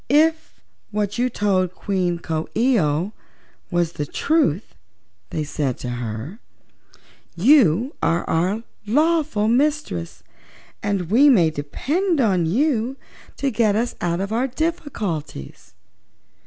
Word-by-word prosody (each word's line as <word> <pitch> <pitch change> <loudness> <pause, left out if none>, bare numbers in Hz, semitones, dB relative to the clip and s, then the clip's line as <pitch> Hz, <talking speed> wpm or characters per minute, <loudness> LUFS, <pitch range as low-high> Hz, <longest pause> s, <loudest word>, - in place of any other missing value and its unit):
"If 320 +3 +2 0.3
what 210 +1 -2
you 250 +1 +2
told 185 -5 0
Queen 180 -3 -1
Coo 160 -2 -3
ee 245 0 +3
oh 155 +5 0 0.6
was 175 -2 0
the 150 - -3
truth," 255 - 0 0.6
they 155 - -2
said 145 -4 -2
to 125 - -5
her, 120 - -5 1.0
"you 235 - +4
are 165 +1 +1
our 185 +7 0 0.2
lawful 300 -4 +2
mistress, 260 - 0 0.6
and 200 -4 -2
we 275 +6 +6
may 175 - +5
depend 295 - -1
on 190 -9 +2
you 255 - +1 0.4
to 275 -1 0
get 215 -3 +2
us 235 +3 0
out 170 0 0
of 200 +2 -3
our 240 +4 +1
difficulties." 220 - -4
205 Hz, 120 wpm, -22 LUFS, 165-265 Hz, 1.0 s, we